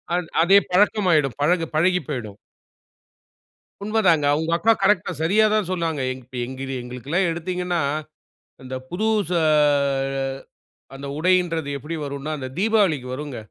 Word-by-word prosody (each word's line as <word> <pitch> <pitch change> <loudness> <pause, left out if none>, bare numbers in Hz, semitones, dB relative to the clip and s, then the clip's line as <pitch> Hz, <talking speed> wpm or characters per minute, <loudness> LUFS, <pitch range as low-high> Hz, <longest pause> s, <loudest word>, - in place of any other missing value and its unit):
அத் 175 -2 -2
அதே 195 +4 +6
பழக்கம் 205 +1 +3
ஆயிடும். 145 -6 +2
பழகு 165 +3 +2
பழகிப் 180 0 +2
போயிடும். 115 -8 -5 1.5
உண்மதாங்க. 195 -8 +2
உங்க 160 +1 -2
அக்கா 225 +6 +4
கரெக்ட்டா 195 -3 +2
சரியா 205 +7 +3
தான் 210 -5 0
சொன்னாங்க. 165 -5 -2
எங் 130 - -12 0.2
எங்கிரி 135 +1 -6
எங்களுக்குலாம் 135 +9 -2
எடுத்தீங்கன்னா 180 +1 -2 0.8
அந்தப் 130 0 -7
புதுசு 205 -2 0
ஆ - - +4 1.5
அந்த 140 +1 -8
உடையின்றது 170 -3 +1
எப்டி 155 +5 -6
வரும்னா, 140 +2 -5
அந்தத் 130 0 -7
தீபாவளிக்கு 195 - +2
வருங்க. 145 -1 -6
165 Hz, 125 wpm, -22 LUFS, 140-185 Hz, 1.5 s, அதே